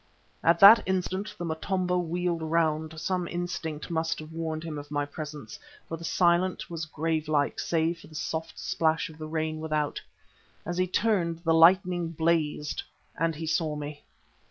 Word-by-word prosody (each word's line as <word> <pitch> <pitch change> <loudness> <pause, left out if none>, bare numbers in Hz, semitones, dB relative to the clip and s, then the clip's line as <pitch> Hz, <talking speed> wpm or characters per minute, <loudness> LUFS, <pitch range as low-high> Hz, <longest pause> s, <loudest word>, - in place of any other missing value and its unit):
At 170 0 +4
that 210 +4 +11
instant 190 +2 -2
the 175 - -4
Motombo 180 +2 -1
wheeled 175 0 -1
round. 160 -1 0
Some 180 +1 -1
instinct 175 -3 -4
must 165 0 0
have 155 0 -9
warned 160 -1 -3
him 155 -3 -5
of 145 0 -10
my 145 -1 -1
presence, 145 -5 -8 0.3
for 165 - -4
the 165 - -10
silence 175 +1 +1
was 160 -2 -4
gravelike 155 -2 0
save 165 0 0
for - - -14
the 155 - -15
soft 160 +1 -4
splash 160 +1 0
of 155 - -16
the 155 - -5
rain 155 0 -2
without. 155 -2 -1 0.6
As 175 +2 -3
he 185 - +2
turned 175 -5 0
the 165 -1 +3
lightning 175 +1 +5
blazed 160 -2 0 0.3
and 165 0 0
he 160 +2 -5
saw 160 -1 0
me. 145 0 -6
165 Hz, 165 wpm, -28 LUFS, 155-175 Hz, 0.6 s, that